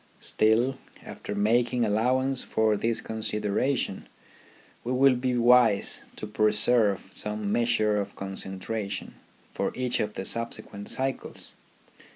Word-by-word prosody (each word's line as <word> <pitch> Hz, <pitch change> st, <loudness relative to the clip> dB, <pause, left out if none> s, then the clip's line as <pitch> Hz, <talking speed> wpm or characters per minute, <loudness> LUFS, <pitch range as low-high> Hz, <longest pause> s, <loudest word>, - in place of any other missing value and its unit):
Still, 120 Hz, +5 st, +2 dB, 0.3 s
after 105 Hz, -, -6 dB
making 120 Hz, +3 st, +2 dB
allowance 130 Hz, +5 st, +1 dB
for 110 Hz, -1 st, +1 dB
this 115 Hz, +2 st, -1 dB
consideration, 110 Hz, +1 st, -2 dB, 0.8 s
we 120 Hz, -, -3 dB
will 135 Hz, 0 st, +5 dB
be 125 Hz, 0 st, -1 dB
wise 120 Hz, -3 st, +4 dB
to -, -, -6 dB
preserve 105 Hz, -1 st, +2 dB
some 105 Hz, -1 st, -3 dB
measure 115 Hz, -2 st, +2 dB
of 100 Hz, -, -7 dB
concentration 95 Hz, +2 st, -4 dB, 0.4 s
for -, -, -1 dB
each 125 Hz, -1 st, -1 dB
of 105 Hz, 0 st, -2 dB
the 95 Hz, -, -4 dB
subsequent 110 Hz, -3 st, -3 dB
cycles. 135 Hz, 0 st, -2 dB
110 Hz, 115 wpm, -27 LUFS, 105-125 Hz, 0.8 s, will